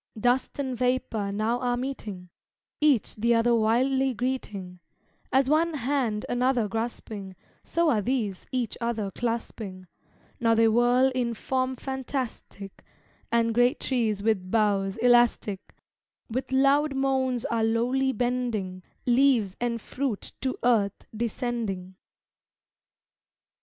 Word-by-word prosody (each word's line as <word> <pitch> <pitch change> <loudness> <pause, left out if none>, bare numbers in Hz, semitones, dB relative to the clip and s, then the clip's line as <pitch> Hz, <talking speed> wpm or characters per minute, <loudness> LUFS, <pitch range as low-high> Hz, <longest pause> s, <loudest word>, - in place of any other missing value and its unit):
Dust 245 +3 +1
and 265 -3 -2
vapor 245 -5 0
now 220 +4 0
are 245 -1 0
meeting, 215 -9 -5 0.5
Each 290 -8 +3
the 235 +2 +2
other 235 +1 +3
wildly 255 +4 +2
greeting; 205 -7 -4 0.5
As 265 0 +3
one 320 +3 +2
hand 250 -5 -1
another 245 -2 +1
grasping, 215 -3 -5 0.3
So 335 -2 +1
are 215 - +2
these 220 -5 -2
each 245 -4 -1
other 225 -4 -2
clasping; 220 -4 -4 0.5
Now 230 -1 +3
they 225 0 +5
whirl 245 +3 +4
in 240 -2 -1
form 260 +3 -1
fantastic 260 -6 -5 0.5
And 230 -1 +2
great 245 +5 +3
trees 220 -6 0
with 200 -4 0
boughs 200 -2 +1
elastic 240 -4 +2 0.6
With 260 +3 -3
loud 275 +2 +3
moans 265 -2 0
are 230 -5 0
lowly 245 +4 +1
bending, 240 -6 -2 0.2
Leaves 245 -6 +3
and 235 -1 -1
fruit 255 -3 -3
to 260 -1 -2
earth 215 -5 +2
descending. 220 -5 -3
240 Hz, 115 wpm, -27 LUFS, 215-260 Hz, 0.6 s, they